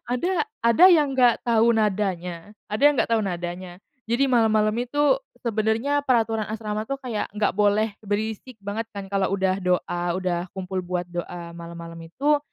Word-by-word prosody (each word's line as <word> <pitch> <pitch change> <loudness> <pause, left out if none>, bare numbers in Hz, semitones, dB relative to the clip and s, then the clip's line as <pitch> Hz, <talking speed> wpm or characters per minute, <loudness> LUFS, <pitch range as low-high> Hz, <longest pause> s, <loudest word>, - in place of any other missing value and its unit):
ada 355 - 0 0.2
ada 235 +9 +5
yang 295 -6 +4
nggak 245 -2 +4
tahu 230 0 +4
nadanya 190 -3 -1 0.2
ada 215 +6 -3
yang 295 - +7
nggak - - +1
tahu 225 -1 +3
nadanya. 175 0 -5 0.3
Jadi 250 +4 +3
malam-malam 220 -4 +3
itu 290 - +2 0.3
sebenarnya 230 +6 0
peraturan 225 -4 +1
asrama 215 -1 -3
tuh 275 +5 -4
kayak 240 -6 -4
nggak 210 -3 +1
boleh 210 +1 +2
berisik 215 +3 -4
banget 205 +3 -4
kan 200 -3 -7
kalau 195 -1 0
udah 190 -1 +1
doa, 180 -1 0 0.2
udah 180 -1 -2
kumpul 190 -1 -4
buat 180 0 -3
doa 175 -1 -6
malam-malam 170 0 -9
itu. 290 - +2
210 Hz, 160 wpm, -24 LUFS, 185-235 Hz, 0.3 s, yang